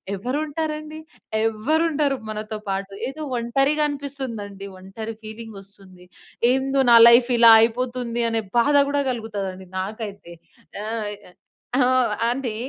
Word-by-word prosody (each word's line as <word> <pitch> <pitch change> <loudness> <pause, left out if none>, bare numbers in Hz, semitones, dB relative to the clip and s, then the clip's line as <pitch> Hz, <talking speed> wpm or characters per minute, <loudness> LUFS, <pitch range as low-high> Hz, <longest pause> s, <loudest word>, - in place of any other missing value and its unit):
ఎవరు 250 +9 -3
ఉంటారండి? 310 0 -5 0.5
ఎవ్వరు 275 +10 0
ఉండరు 290 -2 0
మనతో 215 0 -5
పాటు. 195 0 -3
ఏదో 305 +3 -6
ఒంటరిగా 270 +6 +1
అనిపిస్తుందండి. 240 -9 -6
ఒంటరి 220 +4 -7
ఫీలింగొస్తుంది. 200 -4 -11 0.5
ఏందో 270 +1 +1
నా - - +9
లైఫ్ 240 +1 +5
ఇలా 230 -1 +8
అయిపోతుంది 240 0 -1
అనే 225 0 0 0.2
బాధ 285 +4 +3
కూడా 285 0 0
కలుగుతాదండి 200 -5 -5
నాకైతే. 200 -3 -6 0.5
ఆహ్, 220 -1 -3 0.7
ఆ! - - +5 0.5
అంటే, 245 -4 -3
230 Hz, 115 wpm, -22 LUFS, 210-275 Hz, 0.7 s, నా